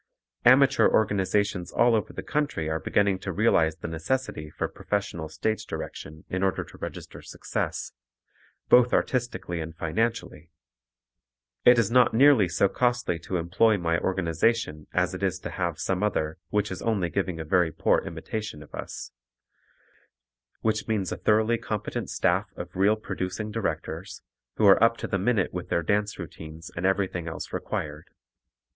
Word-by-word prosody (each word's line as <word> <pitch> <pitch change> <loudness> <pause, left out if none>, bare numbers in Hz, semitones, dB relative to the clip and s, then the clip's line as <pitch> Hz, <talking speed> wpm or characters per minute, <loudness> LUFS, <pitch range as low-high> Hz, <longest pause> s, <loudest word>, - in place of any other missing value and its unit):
Amateur 135 +2 +6
organizations 100 -3 +1
all 120 0 +4
over 110 -2 0
the - - -6
country 145 - -1
are 80 0 -1
beginning 100 0 +1
to 95 - -4
realize 85 -6 +3
the 85 - -6
necessity 80 - -3
for - - -3
professional 90 -6 -3
stage 110 +7 -2
direction 80 +1 -7
in 95 - -3
order 95 -1 +1
to - - -15
register - - -7
success, - - -4 0.8
both 125 0 +6
artistically 120 -9 -1
and 80 0 -7
financially. 90 -2 -2 1.2
It 125 0 +8
is 115 -3 +2
not 125 -2 +5
nearly 130 -7 +6
so 100 - +3
costly 120 -6 0
to 90 +3 -3
employ 95 +6 +3
my 85 -2 0
organization 85 -2 0
as 90 0 +1
it 90 - -6
is 95 -2 0
to - - -5
have 85 -4 -2
some 95 +2 -1
other 85 -5 -1
which 105 +2 0
is 95 - -5
only 100 -7 0
giving 95 -4 -2
a 80 - -4
very 90 0 +2
poor - - +2
imitation 105 -9 -6
of - - -19
us, - - -7 1.5
which 110 -1 0
means 105 -5 -1
a - - -3
thoroughly 110 +2 +2
competent 105 -2 -4
staff 95 +4 +1
of 90 +1 -8
real 100 +3 +4
producing 105 0 -4
directors, 115 -1 -4 0.3
who 110 - +2
are 100 +3 +7
up 115 0 +4
to - - -5
the 95 - -1
minute 105 -1 +1
with 90 -1 -5
their 85 - +1
dance 105 +4 0
routines 80 -1 -9
and 85 +2 0
everything 95 -3 -1
else 80 - -6
required. 75 +1 -4
95 Hz, 160 wpm, -26 LUFS, 85-110 Hz, 1.5 s, It